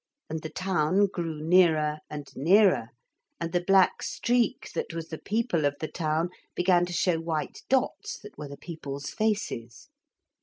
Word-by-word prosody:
And 160 0 -3
the 160 - -5
town 185 +1 +2
grew 165 -5 -4
nearer 160 -3 +4
and 150 -1 -6
nearer, 180 - +4 0.5
and 170 0 -3
the 175 - +1
black 195 0 +4
streak 240 -2 0
that 165 - -3
was 165 -1 -5
the 160 - -6
people 205 -7 0
of 145 0 +2
the 155 - -3
town 160 +1 -1 0.2
began 180 -1 +3
to - - -6
show 170 -1 +2
white 160 -2 -3
dots 265 -1 0
that 210 -1 -13
were 150 0 -7
the 140 0 -9
people's 140 -4 -6
faces. 210 - -2
165 Hz, 160 wpm, -28 LUFS, 155-190 Hz, 0.5 s, nearer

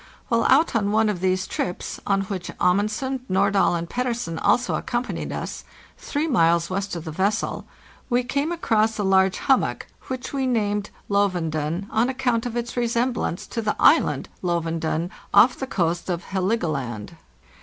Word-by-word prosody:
While 230 -1 +2
out 275 +1 +4
on 205 -2 +1
one 220 0 +3
of 195 -4 -2
these 185 0 +1
trips, 180 - -4
on 195 -1 +2
which 195 -3 -5
Amundsen, 215 +9 +1
Nordahl, 195 -1 +3
and 170 0 -3
Pettersen 235 -8 -2
also 245 0 +2
accompanied 240 +1 -2
us, - - -5 0.4
3 295 +1 -2
miles 170 - +2
west 195 0 -2
of 170 -1 -6
the 160 - -4
vessel 195 +6 -1 0.4
we 245 0 +2
came 280 +6 -1
across 225 -10 +1
a 210 - -1
large 190 -1 +3
hummock, 265 - +1 0.2
which 260 +1 -5
we 270 -1 0
named 210 -4 0
" - - -32
Lovunden," 175 -4 0
on:account 245 0 +1
of 240 0 -4
its 240 0 -3
resemblance 235 -5 -1
to 230 - -4
the 215 -1 -1
island - - +4
" - - -33
Lovunden," 165 -1 -1 0.2
off 220 +5 +7
the 265 - -3
coast 175 -6 -1
of 175 -1 -2
Helgoland. 155 - -2
205 Hz, 160 wpm, -24 LUFS, 175-240 Hz, 0.4 s, off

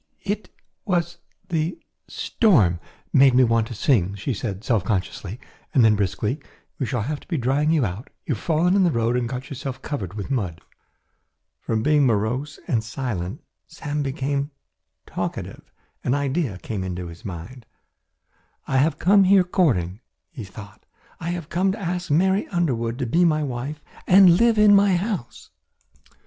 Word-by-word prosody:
"It 205 -1 -3 0.3
was 175 -4 -1 0.3
the 165 +1 -1 0.3
storm 110 - +2 0.3
made 135 -2 +6
me 130 - +6
want 115 -2 +2
to 120 - -7
sing," 100 - +2
she 105 +7 -3
said 100 -2 -5
self 115 -5 +1
consciously, 95 +2 -3 0.4
and 125 -4 +6
then 110 -1 +5
briskly, 105 - -1 0.4
"we 130 - -1
shall 120 -4 -1
have 145 +4 -3
to - - -20
be 170 - -1
drying 135 +4 +1
you 155 -6 +3
out; 100 +6 -5 0.2
you 145 - 0
have 110 - -7
fallen 170 +3 +2
in 200 - +4
the 175 - +4
road 115 -4 +1
and 120 -1 -1
got 130 +2 -6
yourself 135 -1 -5
covered 100 - -4
with 105 +5 -5
mud." 95 -11 -2 1.0
From 110 -1 -2
being 150 0 +4
morose 120 +7 -1
and 115 -4 +1
silent 110 -6 -4 0.2
Sam 145 - -4
became 140 +1 -2 0.6
talkative. - - -5 0.3
An 125 - +1
idea 140 - -1
had 95 - -12
come 105 -4 -3
into 90 -1 -4
his 85 0 -11
mind. 100 +6 -8 1.0
"I 135 - +1
have 150 +5 +2
come 195 +2 +5
here 190 0 +6
courting," 110 - +1 0.3
he 135 -9 -7
thought; 100 +1 -12 0.4
"I 165 - -4
have 175 -2 -4
come 190 +2 +1
to 220 - -7
ask 180 -2 -3
Mary 190 +6 +2
Underwood 125 -10 -1
to 130 - -2
be 170 +10 +2
my 155 -3 +3
wife 140 +3 -5 0.2
and 185 -2 +7
live 235 -1 +4
in 210 -1 +7
my 200 -1 +5
house." 185 - -4
135 Hz, 170 wpm, -23 LUFS, 110-170 Hz, 1.0 s, and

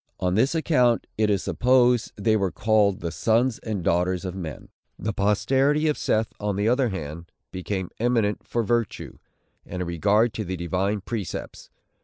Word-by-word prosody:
On 90 -1 0
this 130 - +2
account, 125 -8 +2
it 110 -1 +1
is 100 -2 +1
supposed, 125 -1 +3
they 110 +1 +1
were 100 -3 +1
called 105 -3 +2
the 85 0 -3
Sons 115 +4 +1
and 105 -5 -4
Daughters 90 +2 +1
of 90 - -4
Men. 85 -6 -7 0.3
The 110 +2 -3
posterity 135 +10 +2
of 150 - +2
Seth, 110 0 0
on 105 -1 -1
the 100 +2 0
other 125 +1 +2
hand, 85 -3 -7 0.2
became 95 0 -4
eminent 115 -3 +1
for 120 - -1
virtue, 115 0 -2 0.4
and 90 - -7
a 90 - -2
regard 105 +7 +2
to 110 - -3
the 95 -1 -4
divine 95 +4 -1
precepts. 105 -3 -6
105 Hz, 170 wpm, -24 LUFS, 95-120 Hz, 0.4 s, supposed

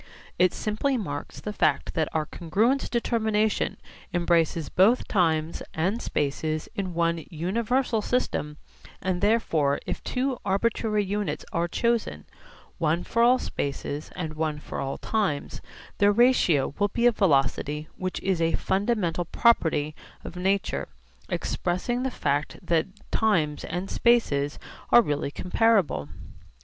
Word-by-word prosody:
It 180 0 +5
simply 250 +6 -1
marks 145 -10 -5
the 210 - -5
fact - - +1
that 160 -3 0
our 155 -1 0
congruence 215 - 0
determination 220 -3 0 0.4
embraces 170 -2 +2
both 210 - +3
times 160 -4 +1
and 190 +9 0
spaces 155 +2 -2
in 185 -3 -4
one 170 -1 +1
universal 225 - 0
system, 150 -11 -1 0.4
and 185 -1 -2
therefore 165 -10 +2
if - - -4
two 255 0 -1
arbitrary 210 +1 +1
units 205 +1 -3
are 170 -1 +1
chosen, 235 +6 -1 0.5
one 165 +1 +1
for 230 - 0
all 245 +2 +6
spaces 145 - -4
and 160 -4 -4
one 155 -1 -2
for 150 - -7
all 135 0 -3
times, 200 -10 -2 0.4
their 205 0 +5
ratio 205 - +3
will 205 - +3
be 235 +4 -1
a 245 - +7
velocity 150 - +1
which 185 0 -3
is 190 -3 0
a 165 0 +2
fundamental 190 -4 0
property 160 -9 +2 0.3
of - - -8
nature 190 +2 0 0.4
expressing 185 +8 -1
the 265 - 0
fact 145 - -1
that 165 0 +1 0.2
times 165 -10 +1
and 180 +3 -4
spaces 150 -12 +2 0.3
are 240 - +7
really 145 -3 -1
comparable. 185 - +1
185 Hz, 130 wpm, -26 LUFS, 155-220 Hz, 0.5 s, a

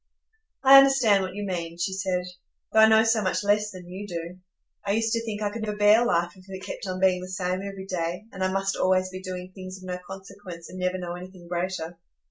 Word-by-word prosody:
"I 275 0 +10
understand 265 -7 +5
what 185 0 -4
you 205 - -4
mean," 170 -3 -4
she 175 +2 -1
said, 190 -2 -1 0.5
"though 220 - +5
I 220 - +9
know 220 0 +6
so 225 -1 +2
much 190 +1 0
less 210 +1 +2
than 185 -3 -11
you 190 +3 -7
do. 170 0 -6 0.4
I 200 - 0
used 225 +1 +1
to 230 0 0
think 215 -2 -4
I 205 - 0
could 230 +1 -6
never 210 -1 -3
bear 210 +3 +6
life 175 -6 +1
if 185 0 -17
it 190 0 -8
kept - - -6
on 185 0 -3
being 185 -1 +3
the 185 - -7
same 185 0 -2
every 195 -1 -7
day, 180 +1 -3
and 190 -1 -4
I 185 - +1
must 195 0 0
always 185 0 +2
be 185 0 -7
doing 185 -1 -6
things 185 0 -8
of 185 - -15
no 180 -1 -4
consequence, 190 -3 -10
and 185 - -8
never 180 0 0
know 175 -1 -5
anything 180 0 -10
greater. 175 -1 -3
185 Hz, 240 wpm, -26 LUFS, 180-205 Hz, 0.5 s, I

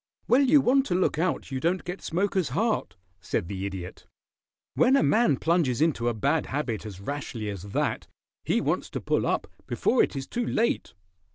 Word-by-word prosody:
"Well, 255 +3 +5
you 280 +1 +5
want 270 +2 +3
to 175 - 0
look 180 -3 +1
out 170 -4 -1
you 130 - -2
don't 175 +6 0
get 180 +2 -6
smoker's 185 -2 0
heart," 215 - -1 0.2
said 85 +1 -2
the 95 0 -3
Idiot. 95 -3 -8 0.7
"When 255 +2 +4
a 275 - +4
man 210 - +3
plunges 160 -6 +1
into 150 -7 +1
a - - -1
bad 140 +8 +1
habit 125 -6 -3
as 95 -3 -9
rashly 115 -3 -4
as 100 -3 -7
that, 100 +1 -2 0.4
he - - +1
wants - - -1
to - - -4
pull - - 0
up - - 0 0.2
before - - +2
it - - 0
is 135 -1 -3
too 240 - -3
late." 230 +2 0
155 Hz, 190 wpm, -27 LUFS, -, 0.7 s, Well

